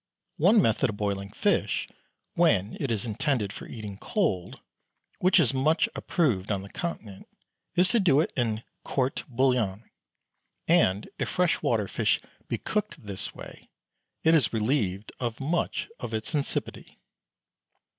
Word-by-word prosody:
One 200 +8 +5
method 115 +3 +2
of 105 - -5
boiling 100 -1 -2
fish, - - 0 0.5
when 115 - +2
it 140 - -1
is 110 -2 -1
intended 115 -3 -1
for - - -9
eating 105 -3 -7
cold, 130 - -1 0.6
which 185 +1 +5
is 140 -6 +3
much 155 +5 +3
approved 120 - 0
of 105 - +2
on 95 - -5
the 100 - -11
Continent, 110 - -6 0.5
is 180 +1 +5
to 235 - +5
do 165 -8 +4
it 155 - 0
in 115 -3 0 0.2
"court 130 0 -1
bouillon," 120 -5 0 0.8
and 110 - +3
if - - -1
fresh 180 -2 +1
water 110 -4 +1
fish - - +1 0.3
be - - -1
cooked 185 - -3
this 100 -2 -5
way - - -11 0.5
it 160 - +5
is 150 -8 +4
relieved 105 -4 0
of 120 -1 -3
much 160 +6 -1
of 115 -2 -4
its 110 +7 -3
insipidity. 145 -2 -2
120 Hz, 145 wpm, -27 LUFS, 105-160 Hz, 0.8 s, One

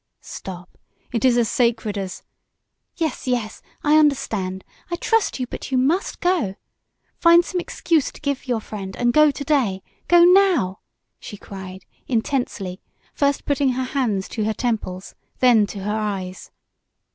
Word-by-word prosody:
"Stop! 180 -1 -9 0.3
It 230 - -1
is 250 -2 +4
as 235 -2 +3
sacred 225 -3 0
as 195 -2 -5 0.4
" - - -56 0.3
"Yes, 315 -6 -2
yes 240 -4 -2 0.2
I 305 +1 +5
understand! 220 -11 0 0.3
I 345 - -1
trust 445 -1 +1
you, 255 - -1
but 250 - -8
you 260 - +2
must 310 - +1
go! 345 - +1 0.6
Find 340 0 +6
some 360 - -2
excuse 335 -4 0
to - - -13
give 280 -2 -3
your 240 -3 0
friend 195 -3 -7
and 240 0 +1
go 305 0 +6
to 285 0 -4
day! 250 -11 +1 0.2
Go 345 -1 +7
now!" 350 - +4 0.4
she 205 - -9
cried, 190 -2 -9 0.2
intensely, 225 -7 -2 0.3
first 280 -1 0
putting 280 -2 +1
her 260 +1 -1
hands 245 -8 -1
to 220 - -3
her 220 0 -1
temples, 210 -6 -3 0.2
then 235 -5 +5
to 200 -1 -7
her 210 +2 -2
eyes. 195 -3 -4
245 Hz, 155 wpm, -22 LUFS, 200-290 Hz, 0.6 s, Go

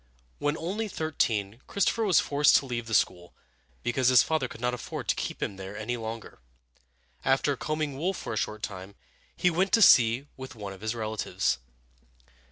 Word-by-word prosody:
When 145 +2 0
only 200 +7 -3
thirteen, 115 - -1
Christopher 210 +3 +1
was 185 -6 +5
forced 145 +1 +4
to - - -2
leave 120 -3 -4
school, 90 -3 0 0.5
because 120 +1 +1
his 125 -2 +7
father 155 -5 0
could - - -11
not 125 +1 0
afford 125 - -6
to - - +3
keep - - -4
him 100 - -4
there 95 +2 -7
any 110 +3 -3
longer. 115 -1 -7 0.8
After 135 +1 +2
combing 155 -1 -3
wool 185 +5 0
for - - -5
a - - -3
short 105 +1 -3
time, 95 0 -6 0.4
he 180 - +3
went 185 +4 +1
to 225 - +5
sea 120 -4 +6
with 130 -1 -9
one 100 -3 -7
of 95 - -14
his 110 +2 -2
relatives. 110 - -1
120 Hz, 175 wpm, -28 LUFS, 110-155 Hz, 0.8 s, his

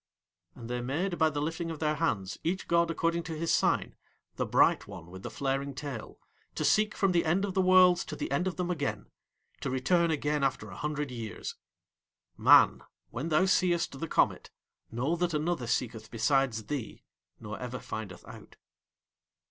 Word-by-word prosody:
And 115 -2 -9
They 125 0 -3
made 170 +9 -2
by 160 -1 +5
the 145 -1 -3
lifting 165 +2 -3
of 165 - -5
Their 150 0 0
hands, 110 - -1
each 185 +3 -2
god 170 0 +3
according 165 +1 0
to 160 -3 -5
his 165 +1 0
sign, - - +1 0.4
the - - -2
Bright - - +3
One 90 -4 -10
with 95 0 -9
the - - -6
flaring 135 0 -2
tail 135 -5 -6 0.4
to - - -1
seek 215 0 +3
from 195 -2 +3
the 170 -1 +3
end 175 +5 +1
of 195 - -4
the 190 - +2
Worlds 185 -1 +6
to 150 - -6
the - - -4
end 175 +7 +1
of 185 - -2
them 180 -1 -2
again, 145 -6 -3 0.5
to 140 - -3
return 170 +7 +2
again 150 -2 0
after 125 -7 -1
a - - -9
hundred 150 +2 -3
years. 115 -3 -6 0.8
Man, - - +6 0.3
when 140 +8 -4
thou 160 +4 +4
seest 175 -6 +1
the 165 - -3
comet, - - +1 0.4
know 130 +9 -1
that 175 -2 0
another 150 -5 -1
seeketh 115 -2 -2
besides 120 -1 +1
thee 125 0 -5 0.4
nor 110 -1 -7
ever 125 0 -5
findeth 110 -7 -7
out. - - -12
150 Hz, 180 wpm, -30 LUFS, 125-170 Hz, 0.8 s, Worlds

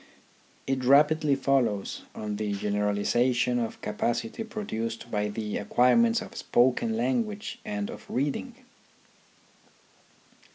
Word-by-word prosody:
It 135 -1 -1
rapidly 150 +2 +4
follows 130 -7 0
on 105 -1 -4
the 105 -1 -2
generalization 105 +5 +1
of 115 -2 -3
capacity 115 - -2
produced 115 - -5
by 105 -1 0
the 105 0 -3
acquire 125 +5 +3
ments 230 -1 +3
of - - -12
spoken 130 - +2
language 230 -2 -1
and 205 -1 -3
of - - -11
reading. 145 - -2
125 Hz, 110 wpm, -27 LUFS, -, -, rapidly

